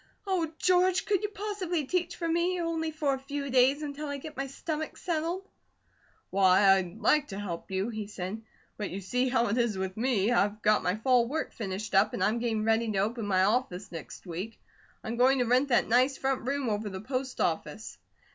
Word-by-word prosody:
Oh, 360 -5 0
George, 365 0 +3
could 400 -2 +1
you 420 - -2
possibly 395 -6 -3
teach 355 +3 -1
for 335 - -3
me, 345 +2 +1
only 330 -1 -1
for 300 -3 0
a 265 - -3
few 280 0 -4
days, 265 +4 +4
until 295 +1 -5
I 285 0 -3
get 300 +2 -9
my 275 0 -3
stomach 310 +3 -4
settled?" 345 +3 -2 0.8
"Why, 195 0 +5
I'd 190 0 -1
like 295 +6 +3
to 195 -1 -6
help 175 -5 -5
you," 190 +3 -1
he 215 -3 -5
said, 205 +1 -5 0.4
"but 210 -2 -3
you 190 - -5
see 250 +7 0
how 240 -2 +2
it 230 +5 +1
is 235 -4 +1
with 190 0 -3
me. 230 -3 +1
I've 210 -2 +1
got 215 0 +4
my 180 - 0
fall 240 +1 +3
work 310 +5 -3
finished 210 0 -5
up, 195 - +4
and 185 - -1
I'm 215 +4 +2
getting 225 -2 -1
ready 225 0 +2
to 200 - -2
open 215 +2 -1
my 185 -2 +3
office 205 -3 0
next 165 +2 -9
week. 185 +6 -6 0.4
I'm 235 0 -4
going 260 +2 +5
to 250 - +2
rent 250 +4 +3
that 245 -3 +3
nice 255 +4 +3
front 265 -2 -1
room 275 -1 -1
over 210 -1 -1
the 190 -1 -6
post 260 +3 -4
office." - - -2
245 Hz, 210 wpm, -29 LUFS, 205-300 Hz, 0.8 s, Why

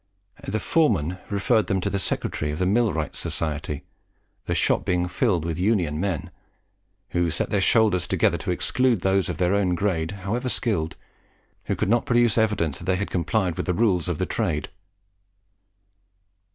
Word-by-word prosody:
The 110 +3 -1
foreman 95 - +1
referred 105 +2 +2
them 95 - +1
to 100 - -1
the 100 - 0
secretary 75 -4 -2
of 75 - -3
the 90 - 0
Millwrights' 95 -6 0
Society, 75 -2 -3 0.6
the - - 0
shop - - +2
being 90 -1 0
filled 90 - 0
with 85 0 -3
Union 90 -7 +1
men, 95 -5 -2 0.8
who 85 -1 +1
set 80 - -1
their 100 - +2
shoulders 105 -3 +3
together - - +2
to - - -5
exclude 125 -6 +1
those 95 0 +1
of - - -3
their 90 +1 +2
own 95 -3 +2
grade, 85 -4 0 0.2
however 120 +6 -1
skilled, 85 -11 -1 0.7
who - - -1
could - - -1
not 120 +1 +2
produce 120 -2 +3
evidence 100 -10 0
that 85 - -9
they 95 0 +2
had 100 +2 -3
complied 90 0 0
with - - -3
the 90 - +1
rules 95 -7 +2
of - - -1
the - - 0
trade. 75 -3 -2
95 Hz, 170 wpm, -24 LUFS, 85-110 Hz, 0.8 s, shoulders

